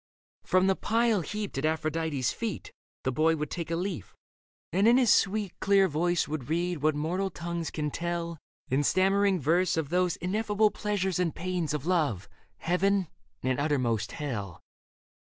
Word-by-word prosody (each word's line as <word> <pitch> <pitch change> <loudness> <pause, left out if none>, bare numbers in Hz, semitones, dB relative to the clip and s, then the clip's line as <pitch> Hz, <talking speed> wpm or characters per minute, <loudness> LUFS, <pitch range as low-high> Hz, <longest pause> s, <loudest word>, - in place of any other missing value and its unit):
From 185 0 +3
the 195 0 +3
pile 225 -1 +1
heaped 205 -3 -4
at 145 - -1
Aphrodite's 155 -3 0
feet 225 -8 -5 0.3
The 130 - 0
boy 160 +5 +2
would 150 -2 -4
take 170 -2 -4
a 165 - 0
leaf, 175 - -4 0.6
and 195 +4 +3
in 240 +2 +6
his 240 -5 +5
sweet, 200 -1 +1
Clear 195 -1 +4
voice 175 +2 0
would 150 -3 -5
read 170 -1 -1
what 155 0 +2
mortal 175 +6 -1
tongues 170 -2 -4
can 150 -1 -3
tell 170 -1 -3 0.3
In 135 +1 +1
stammering 195 +3 +3
verse 170 +4 +2
of 155 -4 -1
those 180 0 +1
ineffable 210 +3 +1
Pleasures 190 -4 -1
and 175 -3 0
pains 180 -3 -2
of 150 -1 -4
love, 150 - 0 0.3
heaven 185 +1 +1 0.3
and 130 0 0
uttermost 125 -7 0
hell. 105 - -5
170 Hz, 160 wpm, -28 LUFS, 150-190 Hz, 0.6 s, in